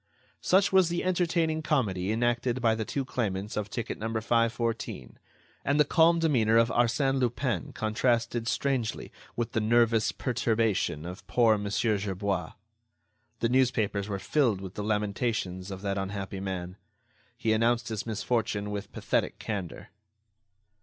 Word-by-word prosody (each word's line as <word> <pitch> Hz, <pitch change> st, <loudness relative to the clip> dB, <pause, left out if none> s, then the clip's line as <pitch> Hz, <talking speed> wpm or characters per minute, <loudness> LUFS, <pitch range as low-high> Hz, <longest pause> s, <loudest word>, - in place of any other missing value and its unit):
Such 190 Hz, +1 st, +3 dB
was 190 Hz, -3 st, +5 dB
the 175 Hz, 0 st, -1 dB
entertaining 170 Hz, -3 st, +1 dB
comedy 105 Hz, -, 0 dB
enacted 120 Hz, +2 st, 0 dB
by 115 Hz, -2 st, +3 dB
the 110 Hz, 0 st, -2 dB
two 135 Hz, +4 st, -2 dB
claimants 105 Hz, -5 st, -3 dB
of 105 Hz, -1 st, -2 dB
ticket 115 Hz, -, -4 dB
No. 110 Hz, -, -2 dB
514; 115 Hz, -, -1 dB, 0.4 s
and 140 Hz, +2 st, +1 dB
the 150 Hz, -, +6 dB
calm 165 Hz, +3 st, +4 dB
demeanor 120 Hz, -9 st, +3 dB
of 115 Hz, 0 st, +4 dB
Arsène 135 Hz, +4 st, +2 dB
Lupin 120 Hz, -5 st, -1 dB
contrasted 115 Hz, +1 st, 0 dB
strangely 125 Hz, -4 st, -1 dB, 0.2 s
with 120 Hz, -1 st, -2 dB
the 110 Hz, -, 0 dB
nervous 115 Hz, 0 st, +3 dB
perturbation 110 Hz, -, 0 dB
of 90 Hz, +3 st, -8 dB
poor 115 Hz, -3 st, +4 dB
Mon. 100 Hz, -1 st, -3 dB
Gerbois. 100 Hz, -4 st, -1 dB, 0.9 s
The 115 Hz, -, +2 dB
newspapers 110 Hz, -5 st, +1 dB
were 100 Hz, -, -2 dB
filled 120 Hz, -2 st, +1 dB
with 95 Hz, -1 st, -8 dB
the 105 Hz, -, -4 dB
lamentations 105 Hz, -3 st, -1 dB
of 95 Hz, 0 st, -7 dB
that 100 Hz, -1 st, -1 dB
unhappy 95 Hz, 0 st, -4 dB
man. 95 Hz, -1 st, -5 dB, 0.6 s
He 110 Hz, -, +1 dB
announced 120 Hz, +2 st, +1 dB
his 110 Hz, 0 st, -4 dB
misfortune 110 Hz, -2 st, -1 dB
with 100 Hz, -1 st, -5 dB
pathetic -, -, -1 dB
candor. 100 Hz, -6 st, -5 dB
115 Hz, 140 wpm, -28 LUFS, 100-125 Hz, 0.9 s, the